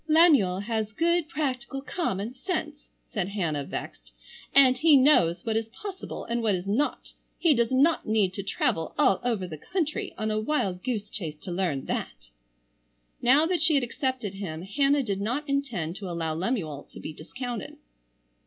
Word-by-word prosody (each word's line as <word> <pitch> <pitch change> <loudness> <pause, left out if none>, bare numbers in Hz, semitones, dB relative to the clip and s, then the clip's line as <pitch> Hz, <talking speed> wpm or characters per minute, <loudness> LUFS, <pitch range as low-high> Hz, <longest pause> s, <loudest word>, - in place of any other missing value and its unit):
"Lemuel 295 - +5
has 215 0 -2
good 340 +2 +1
practical 270 -3 -2
common 225 - -2
sense," 305 0 -4 0.3
said 195 -5 -1
Hannah, 170 -8 -1
vexed, - - -7 0.4
"and 265 -2 +6
he 300 +2 +6
knows 255 - +4
what 225 -1 0
is 225 0 0
possible 385 - -7
and 235 +1 -1
what 215 -4 +2
is 180 0 -4
not. 230 +9 -1 0.2
He 330 -3 +4
does 235 -2 +1
not 280 +4 +3
need 210 -4 +2
to 200 - -4
travel 165 -4 -1
all 190 - +4
over 225 -6 0
the 160 -4 -8
country 320 - -2
on 215 0 -1
a 215 - 0
wild 200 -8 -1
goose 225 -5 -2
chase 165 -7 -6
to 185 - -6
learn 175 -7 -1
that." - - -5 0.9
Now 275 +6 +5
that 350 -1 0
she 315 -1 +4
had 275 - +3
accepted 245 -4 -2
him 175 -5 -5
Hannah 275 +8 +2
did 200 -4 -2
not 250 +9 -2
intend 245 - -2
to 195 -3 -6
allow 165 -2 -2
Lemuel 165 - -2
to - - -9
be 155 - -6
discounted. 240 +8 -6
225 Hz, 170 wpm, -27 LUFS, 185-280 Hz, 0.9 s, and